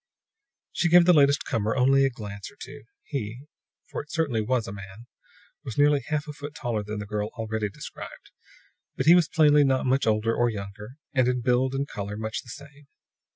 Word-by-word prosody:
She 175 - 0
gave 175 +1 +7
the 180 - +6
latest 140 -2 +4
comer 110 0 -1
only 135 +2 +4
a - - +2
glance 105 -5 -8
or - - -21
two. 140 -1 -10 0.2
He 120 -3 -5 0.5
for - - -3
it 150 - -17
certainly 140 -9 0
was 120 +1 0
a - - -5
man 100 +3 -10 0.6
was 120 - -7
nearly 145 0 +4
a 140 - -13
half 150 0 -1
a 150 - -6
foot 145 +1 -9
taller 120 -7 -2
than 105 +1 -6
the 105 - -5
girl 105 0 -3
already 110 -2 -2
described; - - -10 0.6
but - - -2
he 165 - +8
was 175 -3 +5
plainly 150 -3 +5
not 135 -1 +1
much 130 0 +1
older 110 +1 +2
or 120 0 +2
younger, 105 +2 -7 0.2
and 130 -2 +3
in 125 -1 0
build 125 +2 +1
and 140 +1 -1
color 105 -3 -6
much 110 0 -4
the - - -16
same. 140 +2 -12
125 Hz, 205 wpm, -26 LUFS, 110-145 Hz, 0.6 s, he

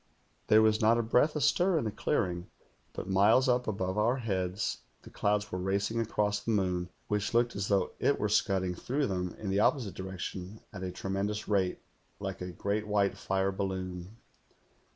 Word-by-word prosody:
There 110 +1 +6
was 110 0 +3
not 115 +2 +5
a 120 - +1
breath 125 +7 +3
astir 175 +4 +3
in - - 0
the 110 - -2
clearing, 90 -9 -1 0.4
but - - -6
miles 100 +7 +4
up 125 0 +2
above 95 -1 -1
our 120 +5 +2
heads 95 -4 -2 0.2
the - - -13
clouds 105 0 0
were 90 - -2
racing 100 +4 0
across 105 -2 0
the 115 - -6
moon, 90 -4 0 0.2
which 105 +2 -1
looked 120 0 +2
as 100 0 -2
though 100 -3 +1
it - - +2
were - - +1
scudding 95 -2 +1
through 135 +10 -1
them 90 -3 -2
in 100 -3 -4
the 100 - +2
opposite 110 - +2
direction 95 +2 -6
at 100 - -7
a 95 - -3
tremen 95 +2 -2
dous 105 0 -4
rate, 95 -3 0 0.4
like - - -5
a 90 0 -4
great 100 +5 -2
white 100 -1 +2
fire 95 0 0
balloon. 95 +1 -4
100 Hz, 185 wpm, -30 LUFS, 95-110 Hz, 0.4 s, There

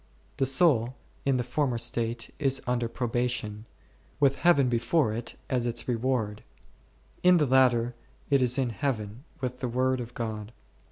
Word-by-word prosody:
The 135 -2 +1
soul 130 -4 +3 0.3
in 135 -2 +2
the 125 - 0
former 130 -2 -1
state 115 0 -1
is 135 -2 +2
under 120 -1 0
pro 120 +1 -3
bation, 115 -3 -2 0.5
with 140 -1 +3
Heaven 140 -4 +4
before 120 +1 +1
it 115 +2 -5
as 125 -2 0
its 120 0 -2
reward; 115 -3 -1 0.8
in 180 0 +6
the 150 - +3
latter 125 -2 +3 0.4
it 140 -1 +4
is 125 +1 +2
in 130 -3 0
Heaven 115 0 -3 0.2
with 125 -1 -3
the 125 - -2
Word 130 +1 +1
of 120 +1 -9
God. 110 -1 -5
125 Hz, 160 wpm, -28 LUFS, 115-135 Hz, 0.8 s, in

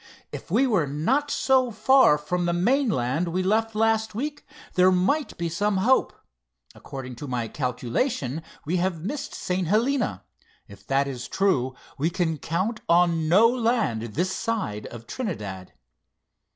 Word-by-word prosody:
"If - - -8
we 270 - +3
were 195 - +1
not 235 - 0
so 260 -2 +2
far 225 - +5
from 175 +4 -2
the 170 - +1
mainland 175 - +1
we 180 +2 -1
left 220 +3 +1
last 220 -1 +1
week, 290 +6 -4 0.3
there 185 +1 +5
might 190 +12 +1
be 170 - -2
some 205 +4 0
hope. 245 +8 +3 0.6
According 130 -3 -8
to 145 - -7
my 120 -3 -2
calculation, 130 - -2 0.2
we 170 +5 0
have 175 -2 -1
missed 285 +6 -4
St. 180 -1 -2
Helena. 240 - +1 0.4
If 100 - -15
that 135 +1 +2
is 125 -3 -5
true, 130 -10 +1 0.2
we 155 +4 +2
can 165 -3 -1
count 185 - -2
on 170 -2 +3
no 205 +7 +6
land 230 - 0
this 165 - -2
side 215 - -3
of 115 -1 -10
Trinidad." 105 - -5
180 Hz, 150 wpm, -25 LUFS, 140-225 Hz, 0.6 s, no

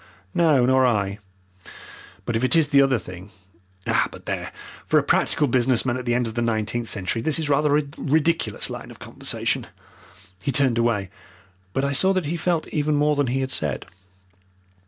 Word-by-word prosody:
"No, 155 -7 +4
nor 130 +1 +4
I. 105 -5 0 1.1
But 120 - -2
if 115 - 0
it 130 +2 +3
is 160 -3 +4
the 140 -2 +5
other 135 -2 +3
thing 90 -1 -10 0.6
but - - -1
there, - - -4 0.4
for - - +3
a - - +3
practical 150 - +1
business 125 -1 +3
man 120 -2 0
at 130 -1 -5
the 120 -1 +1
end 125 0 +1
of 110 - -4
the 120 - -2
nineteenth 115 0 -1
century 100 +3 -1
this 150 +5 0
is 155 -2 -2
rather 145 +1 +3
a 150 - +1 0.2
ridiculous 160 +3 0
line - - -7
of - - -12
conversation." - - -2 0.7
He 140 - -1
turned 130 -2 +2
away, 105 -5 0 0.6
but 135 +7 -1
I 140 - 0
saw 190 +8 +4
that 185 -4 -1
he 160 +4 -2
felt 170 -1 -1
even 150 0 0
more 150 +1 +2
than 145 -2 +1
he 130 +2 -1
had 130 0 -3
said. 75 - -3
130 Hz, 190 wpm, -23 LUFS, 115-150 Hz, 1.1 s, the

